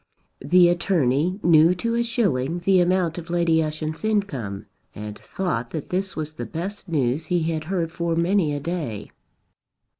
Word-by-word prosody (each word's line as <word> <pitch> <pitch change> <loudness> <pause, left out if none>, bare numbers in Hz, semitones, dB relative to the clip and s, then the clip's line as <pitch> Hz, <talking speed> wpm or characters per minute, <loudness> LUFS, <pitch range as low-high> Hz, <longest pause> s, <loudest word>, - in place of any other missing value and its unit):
The 175 +5 +6
attorney 175 -1 +1
knew 165 +1 +6
to 230 +6 -2
a 235 - +1
shilling 175 - 0
the 190 +1 +4
amount 175 -2 +1
of 170 0 -10
Lady 170 -2 +2
Ushant's 155 +2 -4
income 145 - -2 0.3
and 105 0 -7
thought 125 -11 -3
that 155 -3 -6
this 190 +1 -1
was 155 -1 -4
the 155 - -6
best 195 +2 -6
news 145 0 0
he 175 -1 +1
had 160 -1 -2
heard 170 -2 -2
for 170 -1 -1
many 170 -1 +2
a - - -2
day. 145 - -4
170 Hz, 160 wpm, -23 LUFS, 155-185 Hz, 0.3 s, The